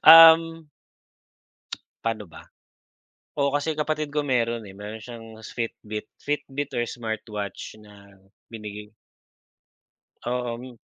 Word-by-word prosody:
Um. 165 0 +10 1.4
Pa'no 115 -2 0
ba. - - -12 0.9
Oo. 140 0 +3
Kasi 155 +2 -1
kapatid 155 0 0
ko 150 - +3
meron, 120 -3 +1
eh, - - -10
meron 105 +2 -6
siyang 115 -1 -8 0.2
Fitbit, 110 -2 -4 0.2
Fitbit 145 -1 -2
or 120 - +2
smartwatch 110 -3 -4
na 100 -1 -16 0.4
binigay. 105 -1 -7 1.4
Oo 120 -1 -1
Mi. 125 -1 -10
120 Hz, 105 wpm, -26 LUFS, 105-145 Hz, 1.4 s, Um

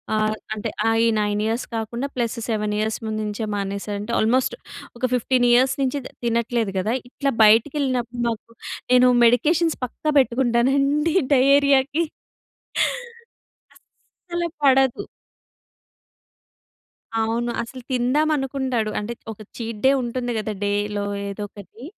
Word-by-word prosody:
ఆహ్, 215 0 +1 0.2
అంటే 215 - -4 0.2
ఆహ్, 225 0 +3
ఈ - - +4
9 205 0 0
ఇయర్స్ 225 +3 -1
కాకుండా, 235 +4 -3
ప్లస్ 240 -1 -1
7 210 -2 -1
ఇయర్స్ 220 +1 -1
ముందు 215 0 -3
నుంచే 210 +1 -3
మానేసంటే 200 +2 -4
ఆల్మోస్ట్ 250 +4 +2 0.4
ఒక - - -17
15 250 0 +2
ఇయర్స్ 255 +2 +4
నుంచి 270 +1 0
తి - - -8
తినట్లేదు 235 -2 0
కదా! 210 +5 0 0.2
ఇట్లా 275 +2 -1
బయటకెళ్ళినప్పుడు, 245 +1 +2
మాకు 230 0 -6 0.4
నేను 250 0 +6 0.2
మెడికేషన్స్ 305 +8 +3
పక్కా 305 +5 -3
పెట్టుకుంటానండి 270 +5 +2 0.2
డయేరియాకి. 280 +3 +4 1.7
అస్సలు 345 -1 -7
పడదు. 265 -2 +4 2.2
అవును. 230 +2 0
అసలు 255 +2 -8
తిందాం 260 +5 +2
అనుకుంటాడు. 265 -5 -1
అంటే, 210 +3 -4 0.2
ఒక 215 - -22 0.2
చీట్ 230 -2 -5
డే 265 - +7
ఉంటుంది 245 0 -3
కదా! 215 0 -3
డేలో 205 0 -1 0.2
ఏదొకటి, 205 +2 -8
240 Hz, 115 wpm, -22 LUFS, 215-265 Hz, 2.2 s, డే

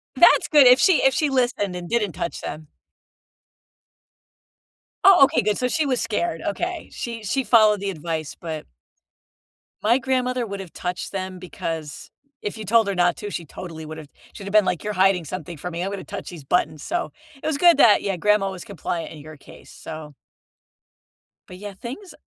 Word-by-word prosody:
That's - - +6
good, 295 -4 +7
if 250 +1 +7
she 370 -5 +4
if 270 - +5
she 300 - +1
listened 240 -8 0
and 175 -1 -7
didn't 220 -5 0
touch 170 - -4
them. 155 0 -7 2.4
Oh, 385 -7 +8
okay, - - +1
good, 210 0 0
so 250 - 0
she 310 +4 0
was 255 -3 0
scared. 170 -6 -2
Okay, 345 - -3
she 230 -2 -6
she 265 +6 -1
followed 215 -4 +5
the 200 - -2
advice, 160 -3 -4
but 160 -3 -6 1.2
my 230 +4 +4
grandmother 255 -2 -1
would 200 -2 -6
have 190 -4 -9
touched 180 0 -4
them 185 -1 -5
because 165 -4 -6 0.3
if 205 - -4
you 215 - -7
told 225 +2 +4
her 200 - -1
not 175 0 +3
to, 210 - -6
she 175 -4 -5
totally 160 0 -9
would've 155 -1 -9 0.3
She'd - - -10
have 200 - -6
been, 215 -2 +6
like, 180 -3 -1
you're 210 0 -3
hiding 190 -2 +3
something 175 +1 -6
from 180 +5 -6
me, 170 - -3
I'm 190 - -2
gonna 200 -1 -5
touch - - -7
these 170 -5 -10
buttons, 155 0 0
so 350 +1 -2 0.3
It - - -4
was 315 -3 0
good 345 0 +6
that, 230 -7 +6
yeah, 195 -2 -2
grandma 210 +1 +2
was 185 -2 -8
compliant 170 -3 -4
in 155 - -11
your 155 +1 -11
case. - - -15
So 155 -2 -9 1.4
but, 180 - -10
yeah, 205 +1 -8
things 255 - -9
195 Hz, 190 wpm, -23 LUFS, 170-240 Hz, 2.4 s, Oh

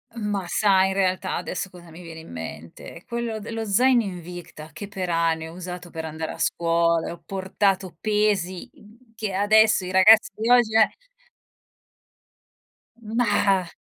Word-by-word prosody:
Ma 205 -4 -3
sai 190 -1 +3
in - - -2
realtà 185 -1 0
adesso 195 - -4
cosa 175 -1 -14
mi 165 +2 -12
viene 165 -1 -9
in 160 - -13
mente? 80 - -9
Quello 235 -2 -3
del 225 +2 -7
lo 225 0 -3
zaino 240 +4 +3
Invicta 175 -4 -9
che 205 +4 -8
per 190 -3 -5
ani 165 -1 0
ho - - -11
usato 180 0 -8
per 160 -1 -6
andare 160 0 -5
a - - -11
scuola, 170 0 +1
e - - -4
ho 170 - -11
portato 190 -1 -1
pesi, 210 -4 0
mhmm, 225 +3 -21
che 215 -3 -4
adesso 215 +1 +4
i 185 - -5
ragazzi 210 +4 +6
di 220 +2 -3
oggi 240 -3 +4
eh. 220 -1 +4 2.1
Mah, 205 -5 +1
190 Hz, 160 wpm, -24 LUFS, 170-215 Hz, 2.1 s, ragazzi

